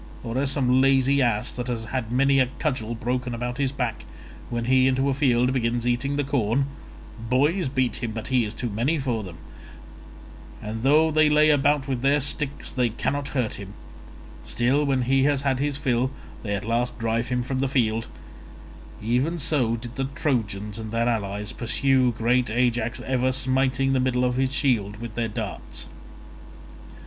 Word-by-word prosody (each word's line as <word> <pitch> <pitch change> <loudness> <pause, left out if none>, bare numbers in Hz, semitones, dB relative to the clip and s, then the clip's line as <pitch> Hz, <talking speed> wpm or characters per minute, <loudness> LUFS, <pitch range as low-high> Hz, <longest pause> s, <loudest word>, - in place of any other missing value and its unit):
Or 115 0 -5
as 140 0 +1
some 130 -2 +2
lazy 135 +1 +3
ass 120 -2 +1
that 125 0 -5
has 115 -2 -3
had 120 -1 -3
many 135 +2 +3
a 130 - +4
cudgel 120 -7 -2
broken 125 +1 -2
about 125 +2 -4
his 135 -2 +1
back, 125 -5 -3 0.5
when 120 -1 -2
he 130 +1 +4
into 135 +1 +1
a - - +2
field 125 -2 +2
begins 120 -2 0
eating 125 +4 0
the 145 - 0
corn—boys 135 - -1
beat 130 -4 0
him 120 - -3
but 110 +2 -5
he 130 -2 +3
is 105 0 -5
too 120 0 -4
many 125 +10 0
for 125 -6 -1
them, 90 -4 -9 1.2
and 110 +1 -5
though 155 +5 +4
they 155 0 +4
lay 150 +1 +5
about 145 -1 +2
with 130 -3 -2
their 140 +2 +3
sticks 140 0 -2
they 125 -2 +1
cannot 140 +5 -2
hurt 120 -4 -1
him; 100 0 -9 0.7
still 130 +5 +1
when 135 -2 +1
he 135 +2 +3
has 140 -1 +2
had 135 -2 +1
his 145 0 0
fill 130 -3 +1 0.3
they 100 -2 -2
at 100 - -5
last 120 +2 -1
drive 115 0 -1
him 125 0 -1
from 130 +1 -3
the 135 - +1
field—even 120 +3 -3
so 130 -6 +1
did 120 +2 -8
the 135 - 0
Trojans 105 -7 -2
and 110 -1 -6
their 115 +1 +1
allies 105 -3 -2
pursue 130 +1 +2
great 120 +1 +1
Ajax, 120 0 0
ever 130 0 0
smiting 130 +1 +1
the 130 - +2
middle 125 -1 +1
of 125 0 0
his 130 0 +1
shield 115 -8 +1
with 115 0 -7
their 115 0 -1
darts. 105 - -6
125 Hz, 175 wpm, -24 LUFS, 115-135 Hz, 1.2 s, lay